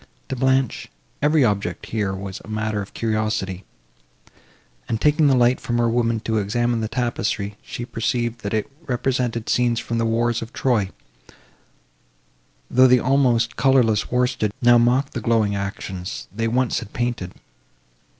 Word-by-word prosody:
To 135 Hz, -, -2 dB
Blanche, 130 Hz, -1 st, +1 dB, 0.3 s
every 150 Hz, -1 st, +4 dB
object 100 Hz, -5 st, -1 dB
here 105 Hz, -3 st, -2 dB
was 95 Hz, 0 st, -6 dB
matter 110 Hz, -1 st, -2 dB
of 100 Hz, -, -10 dB
curiosity; 110 Hz, -4 st, -2 dB, 1.2 s
and, 115 Hz, -, -1 dB
taking 150 Hz, +2 st, +3 dB
the 135 Hz, -, +4 dB
light 125 Hz, 0 st, +3 dB
from 120 Hz, -, -1 dB
her 120 Hz, 0 st, +2 dB
woman 115 Hz, -1 st, +1 dB
to 110 Hz, -1 st, 0 dB
examine 120 Hz, +3 st, 0 dB
the 110 Hz, -, -1 dB
tapestry, 110 Hz, -4 st, -2 dB
she 120 Hz, -, -6 dB
perceived, 120 Hz, 0 st, -2 dB
that 100 Hz, -, -4 dB
it 110 Hz, -, 0 dB, 0.2 s
represented 125 Hz, -2 st, -1 dB
scenes 120 Hz, -2 st, +2 dB
from 115 Hz, -1 st, -3 dB
the 115 Hz, -, +1 dB
wars 115 Hz, +1 st, +1 dB
of 115 Hz, +2 st, -8 dB
Troy, 115 Hz, -7 st, +1 dB, 1.8 s
though 130 Hz, +1 st, +5 dB
the 125 Hz, 0 st, +5 dB
almost 120 Hz, -3 st, +2 dB
colourless 120 Hz, -6 st, +3 dB
worsted 125 Hz, -4 st, +1 dB
now 120 Hz, -2 st, +6 dB
mocked 125 Hz, +4 st, +2 dB
the 120 Hz, -, -3 dB
glowing 110 Hz, -2 st, +1 dB
actions 95 Hz, -2 st, -5 dB
they 115 Hz, +2 st, -1 dB
once 125 Hz, +2 st, +1 dB
had 105 Hz, -3 st, -10 dB
painted. 120 Hz, -7 st, -3 dB
115 Hz, 150 wpm, -22 LUFS, 110-125 Hz, 1.8 s, now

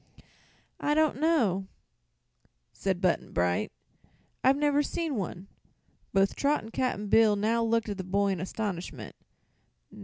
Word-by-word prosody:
"I 295 Hz, -, +1 dB
don't 310 Hz, -2 st, +2 dB
know," 225 Hz, -, +2 dB, 1.1 s
said 190 Hz, -2 st, -2 dB
Button 180 Hz, -3 st, +1 dB
Bright; 90 Hz, 0 st, 0 dB, 0.7 s
"I've 265 Hz, +2 st, +5 dB
never 290 Hz, 0 st, +2 dB
seen 320 Hz, +1 st, -2 dB
one." 190 Hz, -2 st, -4 dB, 0.6 s
Both 195 Hz, 0 st, +2 dB
Trot 290 Hz, -1 st, +1 dB
and 225 Hz, 0 st, -11 dB
Cap'n 230 Hz, -6 st, -1 dB
Bill 215 Hz, 0 st, +5 dB
now 220 Hz, +3 st, +1 dB
looked 230 Hz, 0 st, +1 dB
at 200 Hz, -1 st, -4 dB
the -, -, -2 dB
boy 200 Hz, +2 st, +1 dB
in 190 Hz, -3 st, -1 dB
astonishment. 180 Hz, -, -5 dB
210 Hz, 130 wpm, -28 LUFS, 190-270 Hz, 1.1 s, I've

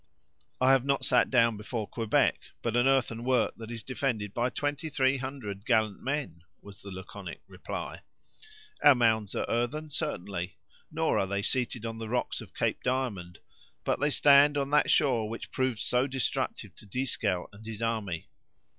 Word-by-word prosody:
"I 130 Hz, +1 st, +5 dB
have 135 Hz, -2 st, +4 dB
not 140 Hz, 0 st, +1 dB
sat 125 Hz, -, +4 dB
down 115 Hz, -3 st, +3 dB
before 110 Hz, +1 st, -4 dB
Quebec, 115 Hz, -3 st, +1 dB, 0.2 s
but 115 Hz, -1 st, -1 dB
an 120 Hz, +2 st, +4 dB
earthen 120 Hz, -4 st, +1 dB
work, 125 Hz, -2 st, +2 dB
that 115 Hz, -1 st, -8 dB
is 115 Hz, -2 st, -6 dB
defended 120 Hz, -6 st, -2 dB
by 120 Hz, +1 st, +1 dB
twenty 145 Hz, +3 st, -2 dB
three 135 Hz, -2 st, +2 dB
hundred 125 Hz, -7 st, -6 dB
gallant 110 Hz, -4 st, +1 dB
men," 135 Hz, -, -3 dB, 0.2 s
was 100 Hz, -1 st, -13 dB
the 100 Hz, -, -9 dB
laconic 95 Hz, -1 st, -8 dB
reply. -, -, -6 dB, 0.8 s
"Our 145 Hz, -2 st, +8 dB
mounds 110 Hz, -4 st, +2 dB
are -, -, 0 dB
earthen, 150 Hz, +7 st, -1 dB
certainly—nor 100 Hz, -, -3 dB
are 95 Hz, -, 0 dB
they 100 Hz, +1 st, -2 dB
seated 120 Hz, -1 st, -1 dB
on 115 Hz, 0 st, -5 dB
the 110 Hz, -1 st, -5 dB
rocks 125 Hz, +1 st, -1 dB
of -, -, -13 dB
Cape -, -, 0 dB
Diamond; 120 Hz, -9 st, -2 dB, 0.5 s
but -, -, 0 dB
they 145 Hz, -, +2 dB
stand 145 Hz, 0 st, +6 dB
on 140 Hz, 0 st, -1 dB
that 150 Hz, -, +4 dB
shore 120 Hz, -6 st, +3 dB
which 115 Hz, -, -7 dB
proved 130 Hz, -3 st, 0 dB
so 125 Hz, +4 st, +1 dB
destructive 130 Hz, -2 st, -2 dB
to -, -, -11 dB
Dieskau 105 Hz, -5 st, -1 dB
and 105 Hz, +2 st, -13 dB
his 110 Hz, 0 st, -5 dB
army. 105 Hz, -8 st, -2 dB
120 Hz, 170 wpm, -29 LUFS, 105-135 Hz, 0.8 s, Our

